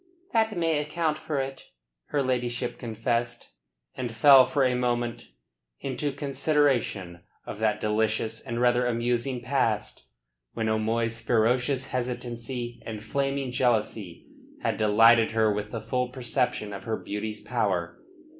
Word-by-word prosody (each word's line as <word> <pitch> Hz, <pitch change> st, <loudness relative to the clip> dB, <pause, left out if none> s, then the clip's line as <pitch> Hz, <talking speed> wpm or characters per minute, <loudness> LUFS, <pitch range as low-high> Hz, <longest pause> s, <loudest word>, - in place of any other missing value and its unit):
"That 220 Hz, -3 st, +2 dB
may 165 Hz, -3 st, +2 dB
account 155 Hz, +1 st, -1 dB
for 155 Hz, -2 st, -3 dB
it," 135 Hz, 0 st, -5 dB, 0.4 s
her 145 Hz, -2 st, 0 dB
ladyship 125 Hz, -1 st, -2 dB
confessed, 120 Hz, 0 st, -2 dB, 0.4 s
and 120 Hz, -2 st, -4 dB
fell 130 Hz, +3 st, +7 dB
for 135 Hz, +1 st, +1 dB
a 130 Hz, -1 st, +3 dB
moment 120 Hz, -1 st, -1 dB, 0.5 s
into 135 Hz, +2 st, -2 dB
consideration 135 Hz, -, 0 dB, 0.3 s
of -, -, -7 dB
that 110 Hz, -1 st, +1 dB
delicious 110 Hz, +1 st, 0 dB
and 115 Hz, 0 st, -4 dB
rather 125 Hz, 0 st, +3 dB
amusing 120 Hz, +2 st, -1 dB
past, 115 Hz, -, -1 dB, 0.5 s
when 110 Hz, -1 st, -1 dB
O'Moy's 110 Hz, +1 st, 0 dB
ferocious 125 Hz, +4 st, +1 dB
hesitancy 120 Hz, -1 st, -4 dB
and 110 Hz, -2 st, -6 dB
flaming 135 Hz, -1 st, -1 dB
jealousy 110 Hz, -7 st, -1 dB, 0.4 s
had -, -, 0 dB
delighted 115 Hz, +2 st, +5 dB
her 110 Hz, -2 st, +3 dB
with 105 Hz, 0 st, -4 dB
the 115 Hz, -, -4 dB
full 125 Hz, +3 st, -1 dB
perception 125 Hz, -4 st, -1 dB
of 100 Hz, -, -8 dB
her 110 Hz, -1 st, -1 dB
beauty's 105 Hz, +1 st, -5 dB
power. 100 Hz, -8 st, -1 dB
120 Hz, 130 wpm, -27 LUFS, 110-130 Hz, 0.5 s, fell